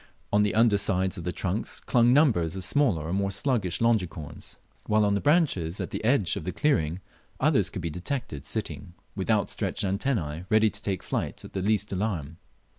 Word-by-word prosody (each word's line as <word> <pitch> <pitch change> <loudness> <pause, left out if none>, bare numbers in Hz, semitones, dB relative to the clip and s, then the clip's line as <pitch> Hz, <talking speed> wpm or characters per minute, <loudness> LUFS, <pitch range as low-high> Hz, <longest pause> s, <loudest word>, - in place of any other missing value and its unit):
On 105 - +5
the 105 0 +1
under 110 -2 +4
sides 95 -2 0
of 85 - -7
the 90 - -1
trunks 95 +5 -3
clung 120 0 +3
numbers 110 - +3
of 95 - -4
smaller 105 - +2
or 85 - -3
more 100 0 0
sluggish 100 - 0
Longicorns, 90 -10 -1 0.3
while 105 0 +3
on 100 - +2
the 100 - 0
branches 145 - +2
at - - -4
the - - -4
edge 110 -7 +2
of 100 - -5
the 90 - -3
clearing 85 - 0 0.4
others - - +2
could - - -6
be 85 - -2
detected 90 - -4
sitting 85 - -5 0.2
with - - -4
outstretched - - 0
antenna 95 - -1
ready 110 0 +4
to 100 - -7
take 95 -4 -3
flight - - -3
at - - -12
the 95 - -2
least 105 +1 +1
alarm. 90 -7 -3
100 Hz, 190 wpm, -27 LUFS, 85-110 Hz, 0.4 s, On